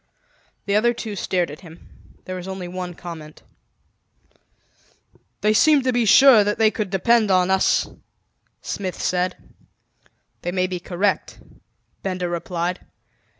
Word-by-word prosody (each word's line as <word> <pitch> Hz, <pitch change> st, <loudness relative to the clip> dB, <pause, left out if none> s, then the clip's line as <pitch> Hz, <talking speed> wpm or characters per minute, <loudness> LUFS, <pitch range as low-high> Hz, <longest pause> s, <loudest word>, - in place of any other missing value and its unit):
The 200 Hz, -, 0 dB
other 240 Hz, +3 st, +3 dB
two 220 Hz, -3 st, -6 dB
stared 180 Hz, -5 st, -1 dB
at 150 Hz, -, -10 dB
him. 165 Hz, -1 st, -14 dB, 0.4 s
There 185 Hz, -, -5 dB
was 180 Hz, 0 st, -7 dB
only 190 Hz, -2 st, -6 dB
one 180 Hz, -1 st, -6 dB
comment. 160 Hz, -4 st, -10 dB, 2.0 s
"They 210 Hz, +2 st, +3 dB
seem 290 Hz, +5 st, +4 dB
to 255 Hz, 0 st, 0 dB
be 240 Hz, -1 st, +1 dB
sure 245 Hz, 0 st, +7 dB
that 205 Hz, +1 st, -1 dB
they 220 Hz, -1 st, +4 dB
could 210 Hz, -3 st, -3 dB
depend 215 Hz, +3 st, +2 dB
on 185 Hz, 0 st, +3 dB
us," 190 Hz, -, +2 dB, 0.8 s
Smith 185 Hz, -3 st, -4 dB
said. 180 Hz, 0 st, -1 dB, 1.0 s
"They 175 Hz, -, -3 dB
may 185 Hz, 0 st, 0 dB
be 180 Hz, -1 st, -4 dB
correct," 185 Hz, +3 st, -2 dB, 0.6 s
Benda 185 Hz, -2 st, -3 dB
replied. 175 Hz, +1 st, -3 dB
185 Hz, 135 wpm, -22 LUFS, 180-210 Hz, 2.0 s, sure